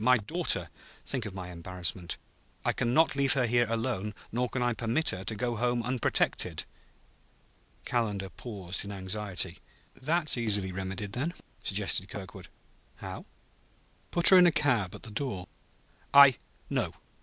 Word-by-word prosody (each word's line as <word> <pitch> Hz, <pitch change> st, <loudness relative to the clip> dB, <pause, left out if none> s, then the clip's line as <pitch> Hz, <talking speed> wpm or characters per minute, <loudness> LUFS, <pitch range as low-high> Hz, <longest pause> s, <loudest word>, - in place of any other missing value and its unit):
My 125 Hz, +2 st, +6 dB
daughter! 110 Hz, -, -1 dB, 0.3 s
Think 125 Hz, -6 st, -3 dB
of 95 Hz, -, -8 dB
my 90 Hz, -1 st, -6 dB
embarrassment; 90 Hz, 0 st, -3 dB, 0.5 s
I -, -, +2 dB
can 120 Hz, -, 0 dB
not 160 Hz, +2 st, +4 dB
leave 140 Hz, -1 st, +3 dB
her 130 Hz, -3 st, +2 dB
here, 120 Hz, 0 st, +2 dB
alone, 115 Hz, -3 st, -2 dB, 0.2 s
nor 125 Hz, +2 st, 0 dB
can 130 Hz, -, -1 dB
I 120 Hz, 0 st, +2 dB
permit 115 Hz, +8 st, 0 dB
her 95 Hz, 0 st, -5 dB
to 110 Hz, -, -2 dB
go 120 Hz, +2 st, -1 dB
home 120 Hz, +1 st, +1 dB
unprotected." 125 Hz, +1 st, +1 dB, 1.2 s
Calendar 105 Hz, -6 st, -1 dB
paused 95 Hz, -4 st, -4 dB
in 100 Hz, -, -7 dB
anxiety. 95 Hz, -1 st, -3 dB, 0.4 s
"That's 155 Hz, +2 st, 0 dB
easily 100 Hz, -5 st, 0 dB
remedied, 95 Hz, +2 st, -4 dB
then," 155 Hz, +8 st, -2 dB, 0.3 s
suggested -, -, 0 dB
Kirkwood. -, -, -8 dB, 0.5 s
"How?" -, -, -8 dB, 0.8 s
"Put 170 Hz, -1 st, +7 dB
her 190 Hz, -, +9 dB
in 180 Hz, -, +8 dB
a -, -, +5 dB
cab 125 Hz, -, +1 dB
at -, -, -11 dB
the 110 Hz, -, -9 dB
door." 105 Hz, -6 st, -3 dB, 0.7 s
"I... 140 Hz, -3 st, +9 dB, 0.3 s
No. -, -, -1 dB
115 Hz, 150 wpm, -29 LUFS, 95-130 Hz, 1.2 s, her